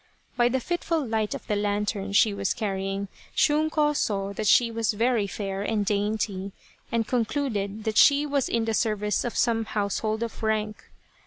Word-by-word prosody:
By 240 0 +3
the 260 +2 0
fitful 330 +1 -1
light 220 -2 -1
of - - -8
the 210 - -1
lantern 205 -1 -1
she 205 +1 +4
was 200 -1 -1
carrying, 195 -3 -2 0.3
Shunko 300 0 +2
saw 200 -5 -1
that 215 +1 -2
she 235 +1 +5
Was 225 -1 0
very 225 -1 +1
fair 195 -1 -4
and 210 0 0
dainty, 200 -1 -1 0.4
and 230 -2 0
concluded 220 -4 -1
that 220 0 -2
she 285 +1 +6
was 280 -3 0
in 230 -1 0
the 225 - -1
service 210 -2 0
of 240 - -4
some 230 -2 +2
household 215 +2 -1
of 230 - -6
rank. 215 -1 -1
220 Hz, 170 wpm, -26 LUFS, 205-235 Hz, 0.4 s, she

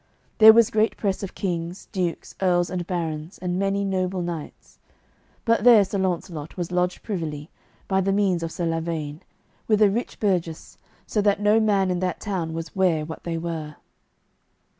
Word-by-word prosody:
There 220 0 +11
was 230 0 +4
great 220 +1 +1
press 195 -3 -1
of 195 - -6
kings, 175 -1 -4
dukes, 180 -3 -3
earls, 175 -2 +2
and 180 -2 -3
barons, 165 -1 -4
and 180 0 -2
many 195 0 0
noble 185 -1 -1
knights; 170 -3 -7 0.7
but 230 -2 +2
there 230 -4 +7
Sir 195 +1 -3
Launcelot 170 -4 -3
was 175 -1 -3
lodged 180 0 -1
privily, 160 -7 -4 0.4
by 190 -1 +2
the 195 +1 +1
means 195 -3 +1
of 165 0 -4
Sir 175 - -3
Lavaine, 165 -2 -3 0.5
with 215 -2 +3
a 210 -2 +5
rich 235 +4 -3
burgess, 175 -6 -2 0.3
so 210 - 0
that 200 -1 +2
no 210 +2 +4
man 200 -4 +2
in 180 - -1
that 180 -1 -2
town 180 -6 -3
was 165 -1 -6
ware 175 -5 +2
what 160 +1 -9
they 170 -1 -2
were. 160 -3 -5
180 Hz, 175 wpm, -24 LUFS, 165-200 Hz, 0.7 s, There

